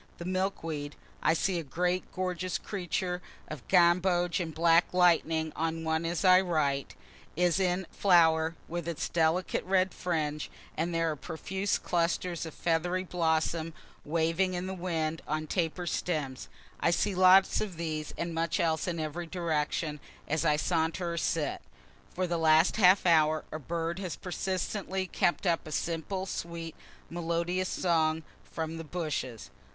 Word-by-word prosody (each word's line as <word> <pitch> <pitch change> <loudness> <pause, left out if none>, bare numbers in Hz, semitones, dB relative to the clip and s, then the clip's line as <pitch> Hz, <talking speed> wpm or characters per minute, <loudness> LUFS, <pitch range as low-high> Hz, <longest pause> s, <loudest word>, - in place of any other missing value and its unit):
The 170 - -7
milk 185 +1 -1
weed, 150 -3 -4 0.3
(I 160 - +3
see 180 +1 0
a - - -4
great 180 +5 -1
gorgeous 185 0 -2
creature 180 -2 -3 0.3
of 150 -5 -8
gamboge 175 0 +3
and 170 -3 -3
black 165 +2 +3
lighting 165 -3 +3
on 165 0 -2
one 160 +1 0
as 170 +3 -1
I 185 0 +7
write,) 150 -6 -1 0.4
is 175 +2 +2
in 185 0 +1
flower, 165 -3 +4
with 170 -1 -4
its 170 -3 -2
delicate 165 +2 +1
red 185 0 +2
fringe; 155 -4 -2 0.3
and 165 +3 -1
there 165 -1 +1
are - - -3
profuse 190 +6 -2
clusters 170 0 -1
of 160 - -8
a - - -20
feathery 175 +2 0
blossom 165 -2 0 0.3
waving 165 +4 +1
in 180 +1 -3
the 190 - -4
wind 165 -3 -2
on 155 +1 -1
taper 175 +2 -1
stems. 150 -7 -2 0.3
I - - +2
see 195 +4 +1
lots 185 +1 +6
of 195 -6 -4
these 155 -2 -3
and 170 0 -3
much 165 0 0
else 160 0 +1
in 170 -2 -2
every 160 +2 -4
direction, 155 -3 -1 0.3
as 155 +1 0
I 150 -3 +3
saunter 165 +2 0
or - - -4
sit. 155 -3 -1 0.5
For 185 - 0
the 170 -1 -1
last 160 +4 +4
half 190 -2 +6
hour 155 -2 +4
a 155 - -4
bird 165 +3 -3
has 185 -4 -4
persistently 190 +1 -3
kept 175 +1 0
up 170 -3 +1
a - - -7
simple, 170 +5 -2
sweet, 170 -3 -5 0.3
melodious 170 +2 -1
song, 160 -2 +1 0.3
from 160 0 -4
the - - -5
bushes. 150 -8 -4
170 Hz, 155 wpm, -30 LUFS, 160-180 Hz, 0.5 s, I